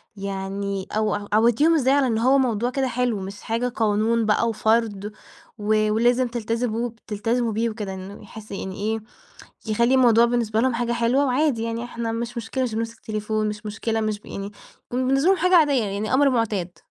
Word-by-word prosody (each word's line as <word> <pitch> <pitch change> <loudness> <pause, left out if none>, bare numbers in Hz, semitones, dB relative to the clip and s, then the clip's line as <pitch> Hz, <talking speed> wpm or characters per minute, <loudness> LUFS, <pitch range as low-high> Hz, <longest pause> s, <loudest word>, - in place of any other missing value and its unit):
يعني 195 0 -4
أو 215 -1 0
ع 205 0 -4
عودتيهم 240 +9 +4
إزاي 265 -2 +3
على 280 -2 +3
إن 225 -2 0
هو 260 +4 +4
موضوع 240 -2 +1
كده 265 0 -1
حلو، 245 -4 -1
مش 195 +2 -7
حاجة 230 +2 -1
قانون 225 0 +1
بقى 225 +2 +2
وفرض 215 -2 0 0.5
و 215 0 +1
ولازم 240 +3 +3
تلتزبوا 235 0 -2
ب 230 - -18
تلتزموا 225 +3 -1
بيه 230 +2 0
وكده 210 -3 -5
إنه 190 +2 -9
يحس 215 +1 -12
يعني 190 -1 -5
إيه 220 +2 -2 0.7
يخلّي 235 +4 +2
الموضوع 235 -2 +5
بالنسبة 230 -2 0
لهم 260 -1 +2
حاجة 235 0 -1
حلوة 240 +4 +2
وعادي 260 -3 +1
يعني 230 +1 -3
إحنا 235 -1 -4
مش 235 +1 -4
مشكلة 245 +4 -2
مش 230 -3 -2
بنمسك 230 0 -4
تليفون 215 0 -2
مش 210 +1 -7
مشكلة 220 +1 -2
مش 215 -1 -2
ب - - -21
يعني 200 +1 -6 0.4
وبالنسبة 265 +5 +1
لهم 385 - +4
حاجة 365 +2 +3
عادية، 285 -7 +4
يعني 205 +3 -3
أمر 280 +1 +5
مُعتاد؟ 210 -7 -1
230 Hz, 190 wpm, -23 LUFS, 210-245 Hz, 0.7 s, الموضوع